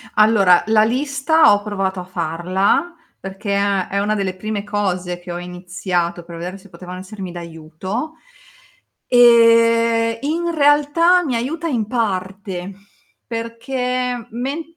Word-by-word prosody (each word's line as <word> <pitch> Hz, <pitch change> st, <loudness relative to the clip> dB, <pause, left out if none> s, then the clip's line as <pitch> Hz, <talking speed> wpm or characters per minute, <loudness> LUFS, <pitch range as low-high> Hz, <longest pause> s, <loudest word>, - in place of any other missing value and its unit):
Allora, 210 Hz, -5 st, +5 dB
la 220 Hz, 0 st, +4 dB
lista 280 Hz, +5 st, +3 dB
ho 205 Hz, 0 st, +1 dB
provato 195 Hz, -3 st, -2 dB
a -, -, -7 dB
farla, 185 Hz, -, -1 dB, 0.3 s
perché 195 Hz, +2 st, -4 dB
è 200 Hz, -2 st, +1 dB
è 200 Hz, -, -2 dB
una 210 Hz, +1 st, 0 dB
delle 195 Hz, -3 st, -2 dB
prime 210 Hz, +1 st, -4 dB
cose 185 Hz, -4 st, -2 dB
che 175 Hz, 0 st, -8 dB
ho 175 Hz, -, -4 dB
iniziato 180 Hz, -1 st, -3 dB
per 170 Hz, 0 st, -10 dB
vedere 180 Hz, +3 st, -6 dB
se 200 Hz, +1 st, -17 dB
potevano 180 Hz, -1 st, -9 dB
essermi 190 Hz, -1 st, -8 dB
d'aiuto 170 Hz, -, -6 dB, 1.0 s
e 230 Hz, -1 st, +5 dB
in 335 Hz, +4 st, -2 dB
realtà 300 Hz, +4 st, +4 dB
mi 270 Hz, -6 st, -2 dB
aiuta 295 Hz, +8 st, -3 dB
in 240 Hz, -9 st, -1 dB
parte, 195 Hz, -4 st, -3 dB, 0.5 s
perché 250 Hz, +1 st, -3 dB
men 270 Hz, +7 st, -3 dB
210 Hz, 130 wpm, -19 LUFS, 185-245 Hz, 1.0 s, Allora